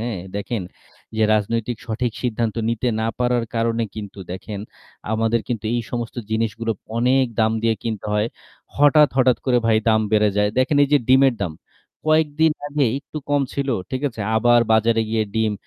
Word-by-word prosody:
হ্যাঁ? 115 -3 -3 0.2
দেখেন 100 +1 -3 0.5
যে 110 - +2
রাজনৈতিক 115 +3 -1
সঠিক 120 +1 -2
সিদ্ধান্ত 115 -3 -1
নিতে 115 +2 0
না 110 - 0
পারার 125 -1 +1
কারণে 115 0 +1
কিন্তু 105 -2 -7
দেখেন 100 +2 -6 0.5
আমাদের 115 +1 +1
কিন্তু 115 -4 -3
এই 120 - +1
সমস্ত 120 -1 -4
জিনিসগুলো 115 +1 -1 0.3
অনেক 130 +3 +3 0.2
দাম 110 0 +3
দিয়ে 115 -1 +2
কিনতে 110 -3 -4
হয়। 105 +2 +1 0.5
হঠাৎ, 145 +1 +6
হঠাৎ 130 -2 +4
করে 125 -2 +4
ভাই 110 -1 +4
দাম 110 -1 +4
বেড়ে 105 -1 +4
যায়। 105 0 +3
দেখেন 130 +3 +2
এই - - -4
যে 145 - +6
ডিমের 130 0 +5
দাম। 90 -5 -2 0.5
কয়েকদিন 155 0 +3 0.2
আগে 145 -1 +1
একটু 145 +2 -8
কম 145 -1 +3
ছিল। 140 0 -2 0.2
ঠিক 130 +1 -3
আছে? 115 -4 -10 0.2
আবার 120 +1 +5
বাজারে 115 +1 +3
গিয়ে 110 -1 +1
ডিম 110 -1 +1
115 Hz, 170 wpm, -21 LUFS, 110-130 Hz, 0.5 s, হঠাৎ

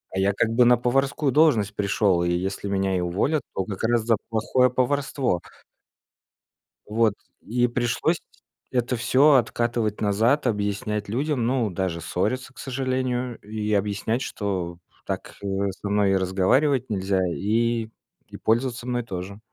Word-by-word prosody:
А - - 0
я 100 +1 +3
как 110 +3 +1
бы 125 +1 +5
на 120 0 +6
поварскую 135 +3 +1
должность 115 -9 +3
пришёл, 100 -3 +2
и 85 - +1
если 95 +3 -2
меня 95 -1 0
и 90 - 0
уволят, 105 - 0
то 95 - -2
как 100 -1 -6
раз 120 0 +2
за 115 0 +3
плохое 125 +3 +2
поварство. 130 - 0 1.4
Вот. 110 0 +2 0.3
И 120 +2 +1
пришлось 120 -1 0 0.5
это 125 0 0
всё 135 +5 +4
откатывать 120 -3 +1
назад, 110 +8 +2
объяснять 105 -1 -1
людям, 130 +1 0
ну, 125 -4 +1
даже 90 -2 -2
ссориться, 130 +10 -2
к - - -16
сожалению, 130 -2 -2
и 105 0 -4
объяснять, 105 +4 0
что 95 -7 -3 0.3
так, - - -5
э, 100 - -5 0.2
со 100 +2 -7
мной 100 -1 +3
разговаривать 115 +9 +2
нельзя 95 -2 0
и 115 +5 0 0.4
и - - -11
пользоваться 120 +2 0
мной 120 -1 -1
тоже. 100 0 -6
110 Hz, 145 wpm, -24 LUFS, 100-125 Hz, 1.4 s, на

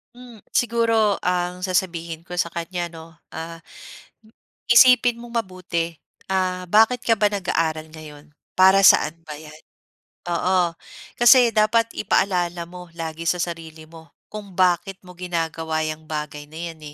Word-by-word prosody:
Hmm, 245 -3 -14
siguro 230 -3 +1
ang 180 0 -2
sasabihin 170 -3 -2
ko 180 - -10
sa 175 -1 -1
kanya 175 +1 -4
'no, 165 0 -13 0.2
ah, 165 +1 -8 1.1
isipin 245 -1 +6
mong 235 0 -9
mabuti, 170 -3 -4 0.4
ah, 185 -1 -1
bakit 225 +5 +3
ka 230 - +2
ba 210 - +4
nag-aaral 165 -6 -2
ngayon? 150 -1 -13 0.2
Para 190 +1 +6
saan 165 -2 +5
ba 150 - -6
'yan? 155 0 -12 0.8
Oo, 180 0 +1 0.5
kasi 240 -1 +7
dapat 225 +1 +2
ipaalala 180 -4 0
mo 180 0 -11
lagi 165 0 -6
sa 180 - +2
sarili 160 -2 -7
mo 165 0 -15 0.2
kung 210 -2 -8
bakit 180 +1 +1
mo 180 - -12
ginagawa 165 -3 -3
'yang 155 0 -5
bagay 150 -1 -6
na 155 +2 -11
'yan 160 - -20
175 Hz, 140 wpm, -22 LUFS, 165-200 Hz, 1.1 s, kasi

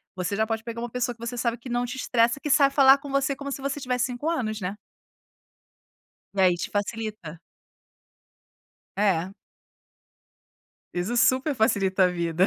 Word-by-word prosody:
você 185 +2 -2
já 220 +1 +1
pode 225 0 -3
pegar 230 0 -6
uma 240 - -4
pessoa 245 0 -2
que 230 0 -9
você 245 +1 -4
sabe 235 0 -1
que 245 +1 -10
não 245 0 0
te 245 +1 -6
estressa, 235 -1 +1
que 295 - -4
sabe 280 -1 +4
falar 270 -1 +7
com 285 0 -10
você 275 +1 0
como 280 0 -6
se 275 - -6
você 275 +1 -3
tivesse 250 -2 0
5 255 +5 -3
anos, 220 -10 -2
né. 190 0 -4 1.6
E 195 - 0
aí 180 -2 +4
te 175 - -5
facilita. 205 -5 -4 1.6
É. 190 -3 +1 1.6
Isso 180 +7 -2
super 260 +4 +3
facilita 200 -5 +2
a - - +4
vida. 170 0 +1
235 Hz, 170 wpm, -25 LUFS, 200-260 Hz, 1.6 s, falar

